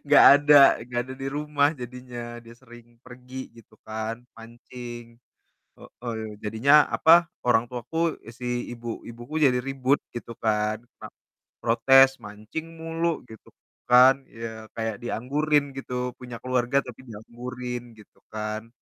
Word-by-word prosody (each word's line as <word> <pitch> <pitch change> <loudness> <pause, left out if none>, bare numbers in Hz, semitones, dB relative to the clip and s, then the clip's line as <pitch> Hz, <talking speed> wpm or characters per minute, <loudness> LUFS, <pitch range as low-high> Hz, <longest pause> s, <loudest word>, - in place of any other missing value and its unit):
Nggak 145 - +7 0.2
ada 145 -1 +7 0.2
nggak 120 0 -2
ada 130 0 -8
di 135 - -3
rumah 145 0 +1
jadinya, 120 -1 -8
dia 115 0 -13
sering 120 -2 -17
pergi 125 0 -10
gitu 110 -1 -18
kan 110 +2 -5
mancing. 120 0 -11 0.6
Heeh, 110 -3 -7
jadinya, 135 +8 +5
apa, 170 +1 +5 0.2
orang 115 -1 +4
tuaku, 160 +7 -2 0.2
si 120 -1 -4
ibu 120 -1 -6
ibuku 120 +7 -6
jadi 130 -4 +4
ribut 135 +1 +1 0.2
gitu 120 0 -7
kan, 110 +1 -1 0.2
pa - - -8 0.6
protes, 135 +3 +5
"Mancing 105 +10 -7
mulu!" 165 0 -2
Gitu 110 - -14 0.4
kan, 130 +2 +7
iya 110 -1 -8
kayak 110 -2 -2
dianggurin 140 +4 0
gitu, 125 -1 -4
punya 125 -2 -8
keluarga 130 +1 +1
tapi 125 0 -10
dianggurin 120 +2 -7
gitu 105 - -19
kan. 110 +1 -4
120 Hz, 130 wpm, -25 LUFS, 115-135 Hz, 0.6 s, Nggak